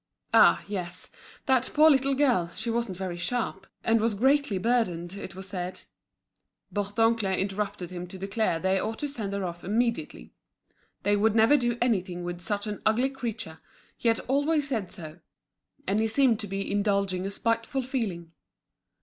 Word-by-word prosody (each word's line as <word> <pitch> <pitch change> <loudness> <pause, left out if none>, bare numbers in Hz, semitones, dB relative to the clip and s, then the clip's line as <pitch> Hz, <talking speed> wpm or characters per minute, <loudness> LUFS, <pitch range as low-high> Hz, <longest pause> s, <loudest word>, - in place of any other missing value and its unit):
Ah! - - +6
yes, 180 -3 -5 0.3
that 260 -1 +3
poor 305 +1 +7
little 270 0 +3
girl; 250 -12 +2
she 230 +1 -3
wasn't 230 -5 -2
very 185 -2 -4
sharp, 195 -2 -2 0.2
and 225 0 +3
was 225 -1 +1
greatly 265 -1 +2
burdened, 185 -6 0
it 195 -3 -8
was 190 0 -8
said. 180 -1 -5 0.9
Bourdoncle 205 +1 +1
interrupted 195 -2 -3
him 180 0 -6
to 190 - -9
declare 195 -2 0
they 190 +2 +1
ought 220 +3 -3
to 295 - -2
send 225 -8 -4
her 200 -1 -2
off 175 -1 -6
immediately. 210 - -1 0.7
They 205 +1 +3
would 215 +1 +2
never 225 +5 +6
do 240 -4 +1
anything 185 -7 0
with 175 0 -5
such 205 +4 -2
an 210 -1 -5
ugly 245 +5 +2
creature, 230 -11 -5 0.4
he - - -3
had 225 -1 +3
always 285 +2 +1
said 220 -9 -2
so; 160 -4 -9 0.7
and 200 +2 +1
he 225 - +2
seemed 235 -1 +3
to 210 - -5
be 195 +1 -3
indulging 200 -2 +1
a - - -2
spiteful 230 +5 -1
feeling. 205 -11 -3
205 Hz, 165 wpm, -27 LUFS, 185-235 Hz, 0.9 s, poor